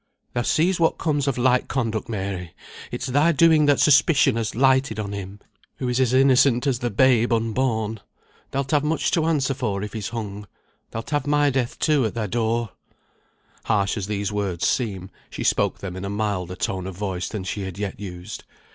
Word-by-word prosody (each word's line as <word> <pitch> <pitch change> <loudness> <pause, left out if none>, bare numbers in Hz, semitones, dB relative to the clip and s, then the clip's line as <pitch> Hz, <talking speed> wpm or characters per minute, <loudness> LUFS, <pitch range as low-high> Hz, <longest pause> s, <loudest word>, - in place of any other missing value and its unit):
"Thou 120 - 0
seest 170 +8 +1
what 165 - +2
comes 145 -3 0
of 135 - 0
light 125 0 +2
conduct, 115 -5 -2
Mary! 95 -5 -4 0.3
It's - - -4
thy 145 +6 +3
doing 160 -1 +4
that 145 -2 +4
suspicion 145 -2 +4
has 115 -2 -2
lighted 130 -2 +2
on 100 -1 -4
him, 100 0 -7 0.4
who 130 - -4
is 125 +1 0
as 130 -3 +2
innocent 130 -1 +4
as 130 -4 +1
the 120 - -1
babe 120 +1 +3
unborn. 115 -1 0 0.5
Thou'lt 135 0 -3
have 150 -2 +3
much 155 +2 0
to 165 -2 +1
answer 145 -4 +1
for 105 -7 -2
if 105 - -6
he's 110 -3 -4
hung. 105 -3 -6 0.4
Thou'lt 115 +5 -7
have 145 -2 0
my 145 -1 +3
death 125 -2 -1
too 150 -4 +2
at 110 - -7
thy 115 -2 -1
door!" 115 +1 -1 0.9
Harsh 100 -3 +1
as 100 -3 -4
these 100 -1 -2
words 100 -4 -2
seem, 95 -6 -2 0.2
she - - -6
spoke - - +1
them 95 -2 -7
in 95 - -6
a 100 - -3
milder 100 -4 -2
tone 95 -1 -3
of 95 -2 -7
voice 95 -3 -3
than 105 -3 -5
she 95 +2 -4
had 95 -1 -6
yet 100 -2 -4
used. 95 +1 -8
115 Hz, 195 wpm, -23 LUFS, 100-135 Hz, 0.9 s, doing